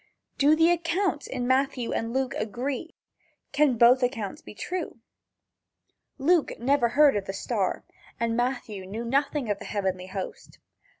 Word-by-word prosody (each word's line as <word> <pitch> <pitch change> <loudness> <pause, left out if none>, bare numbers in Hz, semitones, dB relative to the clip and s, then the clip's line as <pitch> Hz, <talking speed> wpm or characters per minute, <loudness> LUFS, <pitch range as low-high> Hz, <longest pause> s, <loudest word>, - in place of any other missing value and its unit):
Do 290 +2 +5
the 325 +2 +4
accounts 340 -1 0
in 250 -2 -3
Matthew 260 -2 +1
and 230 0 -2
Luke 265 0 -1
agree? 255 - -4 0.6
Can 285 -5 +3
both 245 +3 +6
accounts 225 -5 -2
be - - -12
true? 355 - -4 1.2
Luke 315 +3 +2
never 245 0 +2
heard 290 +1 +5
of 200 -2 -1
the 195 - -4
star, 195 - -2 0.4
and 230 0 0
Matthew 235 -6 -2
knew 220 +5 -5
nothing 275 +1 0
of 200 - -2
the - - -9
heavenly 190 -3 -2
host. 190 0 -7
250 Hz, 145 wpm, -26 LUFS, 225-290 Hz, 1.2 s, both